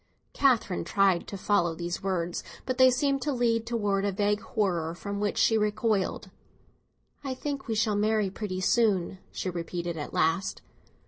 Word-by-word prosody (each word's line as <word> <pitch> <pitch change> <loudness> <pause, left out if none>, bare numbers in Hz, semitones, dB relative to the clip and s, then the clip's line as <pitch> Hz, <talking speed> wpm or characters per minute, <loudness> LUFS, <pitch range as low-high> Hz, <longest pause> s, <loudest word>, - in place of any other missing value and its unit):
Catherine 240 -9 +2
tried 195 -3 +2
to 200 - -6
follow 185 -4 +1
these 175 +1 -4
words, 175 -3 -2 0.2
but 255 0 -2
they 260 0 +8
seemed 275 +2 +1
to 295 - -1
lead 230 -3 +1
towards 205 -4 0
a - - +1
vague 205 +2 +1
horror 175 -8 -1
from 200 +3 -5
which 205 -1 -1
she 225 -1 +4
recoiled. 210 -1 0 0.9
"I 265 -2 -3
think 280 0 -4
we 225 - -1
shall 215 -1 +1
marry 210 -1 +1
pretty 185 -2 -4
soon," 195 -3 +2
she 185 - -3
repeated 170 0 -4
at 150 - -5
last. 165 +4 0
205 Hz, 165 wpm, -28 LUFS, 185-230 Hz, 0.9 s, they